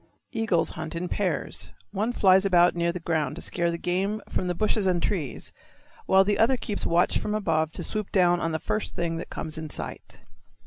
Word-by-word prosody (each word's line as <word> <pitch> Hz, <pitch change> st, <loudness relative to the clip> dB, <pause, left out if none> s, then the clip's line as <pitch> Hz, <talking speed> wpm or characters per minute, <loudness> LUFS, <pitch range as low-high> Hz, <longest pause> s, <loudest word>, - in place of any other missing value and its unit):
Eagles 225 Hz, -8 st, +1 dB
hunt 160 Hz, +1 st, -5 dB
in 175 Hz, +2 st, -2 dB
pairs. -, -, -2 dB, 0.2 s
One 215 Hz, +4 st, -1 dB
flies 190 Hz, -4 st, +5 dB
about 180 Hz, -3 st, +4 dB
near 170 Hz, 0 st, +1 dB
the 180 Hz, -, -5 dB
ground 160 Hz, -4 st, -1 dB
to 175 Hz, -, -7 dB
scare 170 Hz, -1 st, 0 dB
the 170 Hz, -, -2 dB
game 190 Hz, +5 st, -1 dB
from 185 Hz, -, -2 dB
the 180 Hz, -, -1 dB
bushes 215 Hz, +1 st, +1 dB
and 180 Hz, -2 st, +2 dB
trees, 165 Hz, -7 st, -3 dB, 0.6 s
while 190 Hz, 0 st, +6 dB
the 205 Hz, +1 st, 0 dB
other 255 Hz, +4 st, +4 dB
keeps 210 Hz, -4 st, -3 dB
watch 170 Hz, +1 st, +3 dB
from 210 Hz, -, -2 dB
above 160 Hz, -6 st, +1 dB
to -, -, -5 dB
swoop 215 Hz, -2 st, -2 dB
down 175 Hz, -2 st, +4 dB
on 165 Hz, -1 st, -1 dB
the 160 Hz, -, 0 dB
first 215 Hz, +6 st, -3 dB
thing 170 Hz, -1 st, -1 dB
that 170 Hz, -, -6 dB
comes 155 Hz, 0 st, -5 dB
in 160 Hz, -1 st, -6 dB
sight. -, -, -7 dB
180 Hz, 210 wpm, -26 LUFS, 165-205 Hz, 0.6 s, while